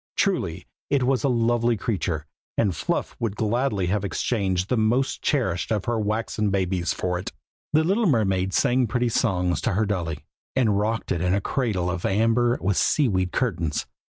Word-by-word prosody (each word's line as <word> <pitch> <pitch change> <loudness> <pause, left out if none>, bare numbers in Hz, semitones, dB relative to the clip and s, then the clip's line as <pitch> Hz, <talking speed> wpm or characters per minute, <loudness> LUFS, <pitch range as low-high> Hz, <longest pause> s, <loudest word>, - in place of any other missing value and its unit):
Truly, - - 0 0.2
it 140 -3 +2
was 130 0 +1
a 140 - +3
lovely 120 -1 +2
creature, 90 -7 -2 0.3
and 100 -6 +2
Fluff - - -2
would 110 -4 -2
gladly 110 -2 0
have 100 +3 0
exchanged 95 -3 -1
the 125 - +1
most 120 +4 +1
cherished 95 - 0
of 105 -3 0
her 120 -1 0
waxen 105 0 -1
babies 95 -2 0
for 90 -1 -2
it. 90 - -6 0.4
The 155 +1 +4
little 200 +6 +2
mermaid 95 - +2
sang 125 +4 +2
pretty 120 +2 0
songs 90 -5 +1
to 120 - 0
her 105 +4 +1
dolly, 85 -7 -3 0.3
and 110 -6 +2
rocked 110 +2 -1
it 85 - 0
in 90 +1 +2
a - - +2
cradle 100 -6 -1
of 90 -1 -4
amber 115 +4 +2
with 95 +2 0
sea 145 -3 +3
weed 95 -3 0
curtains. 85 - -1
105 Hz, 180 wpm, -24 LUFS, 95-120 Hz, 0.4 s, The